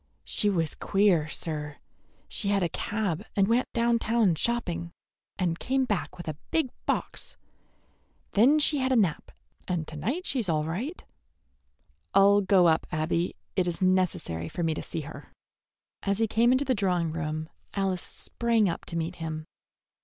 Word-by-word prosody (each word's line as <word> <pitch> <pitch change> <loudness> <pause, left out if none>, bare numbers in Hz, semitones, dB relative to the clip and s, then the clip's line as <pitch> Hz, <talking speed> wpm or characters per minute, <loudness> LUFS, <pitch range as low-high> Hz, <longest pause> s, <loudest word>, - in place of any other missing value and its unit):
She 210 - +1
was 165 -6 0
queer, 195 -6 +2
sir. 150 -2 -4 0.5
She 205 - -2
had 200 -2 +2
a 170 - +1
cab 205 -5 -2
and 195 -1 +3
went 235 +3 +1
down 235 0 +2
town 225 -5 +3
shopping, 175 -3 -1 0.5
and 170 -2 0
came 265 0 +1
back 175 - -2
with 175 - -8
a 155 - -3
big 310 -6 +1 0.2
box. - - -2 0.9
Then 250 +9 +5
she 300 -1 +3
had 260 0 +1
a - - +4
nap, 190 -9 +1 0.4
and 170 -4 -1
to 155 - -8
night 255 - -2
she's 240 -9 -1
all 155 -2 +1
right." 215 - -4 1.1
"I'll 200 +1 +6
go 190 -2 +4
up, 160 -1 +2
Abby. 165 +3 0 0.2
It 185 -2 +2
is 170 -1 -2
necessary 185 - 0
for 175 - -3
me 160 -1 +1
to - - -4
see 165 - -5
her." 145 -1 -10 0.7
As 200 0 0
he 225 - +3
came 230 +2 +3
into 260 +2 +3
the 260 - +2
drawing 180 -6 +1
room 155 -1 -3 0.3
Alice 190 -3 0
sprang 230 -3 0
up 170 - -3
to 170 - -3
meet 165 +2 -3
him. 155 -1 -5
185 Hz, 170 wpm, -28 LUFS, 165-225 Hz, 1.1 s, I'll